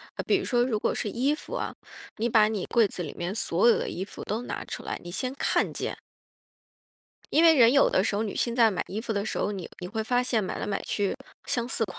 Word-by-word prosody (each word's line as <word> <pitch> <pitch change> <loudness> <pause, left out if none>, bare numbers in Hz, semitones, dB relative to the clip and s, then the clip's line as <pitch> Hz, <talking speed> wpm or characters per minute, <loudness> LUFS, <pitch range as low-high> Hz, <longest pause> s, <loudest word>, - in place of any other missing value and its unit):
呃， - - -4
比 400 - +4
如 380 - -4
说 245 -2 +2
如 245 -4 0
果 - - 0
是 210 - -2
衣 260 +7 +1
服 300 - -6
啊， - - -3 0.4
你 235 +2 0
把 215 -1 +5
你 215 -4 -2
柜 230 -4 +3
子 180 - -7
里 155 - -5
面 175 +2 -3
所 205 -1 +1
有 235 - +6
的 - - -3
衣 190 +2 -4
服 - - -9
都 220 +4 -3
拿 - - -5
出 - - -7
来， - - -4
你 175 - -8
先 255 +8 -2
看 - - +1
见。 - - -4 1.3
因 320 - +5
为 330 -1 +8
人 235 -2 +7
有 275 - +5
的 185 - +2
时 200 - 0
候 215 - 0
女 210 - -4
性 235 -1 0
在 230 -3 +5
买 180 - -2
衣 210 - -4
服 225 -1 -3
的 200 -1 -1
时 - - -3
候， 205 - 0
你 190 -4 -6
你 180 - -5
会 220 +3 -3
发 245 +2 +2
现 230 -4 +1
买 185 - -4
来 - - -3
买 200 -1 -2
去， 205 +2 -1 0.3
相 235 -1 -1
似 225 -3 0
款。 - - -10
220 Hz, 290 characters per minute, -27 LUFS, 200-245 Hz, 1.3 s, 为